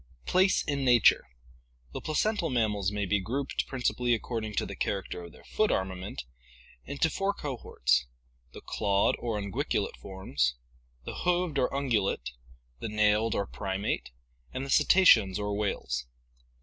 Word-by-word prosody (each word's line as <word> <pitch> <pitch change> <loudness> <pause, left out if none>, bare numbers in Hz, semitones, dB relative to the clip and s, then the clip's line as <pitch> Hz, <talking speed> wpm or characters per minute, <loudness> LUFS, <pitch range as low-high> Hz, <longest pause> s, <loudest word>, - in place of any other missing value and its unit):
Place 190 +1 +3
in 140 -2 -2
Nature. 120 - +5 0.3
— - - -32
The - - -5
placental 170 +3 0
mammals 105 -6 0
may 105 -1 -1
be 100 +2 +1
grouped, 130 +8 -2
principally 125 -2 +1
according 110 -2 -4
to - - 0
the - - -7
character 95 -2 -3
of 85 - -10
their - - -17
foot 215 - +1
armament, 95 -4 -3 0.6
into 140 +3 0
four 195 +5 -1
cohorts: 65 - 0 0.4
the - - -11
clawed 100 -1 +1
or 115 -3 -2
unguiculate 100 -2 -2
forms, 95 -11 -2 0.5
the - - -6
hoofed 175 -4 +1
or 125 - +1
un 140 0 -2
gulate, 100 - 0 0.5
the - - -4
nailed 105 +1 +2
or 100 - 0
primate, 95 +1 -3 0.4
and 130 +1 -4
the 140 - -5
cetaceans 105 - +6
or 105 0 -2
whales. 65 -12 -2
105 Hz, 150 wpm, -29 LUFS, 95-135 Hz, 0.6 s, cetaceans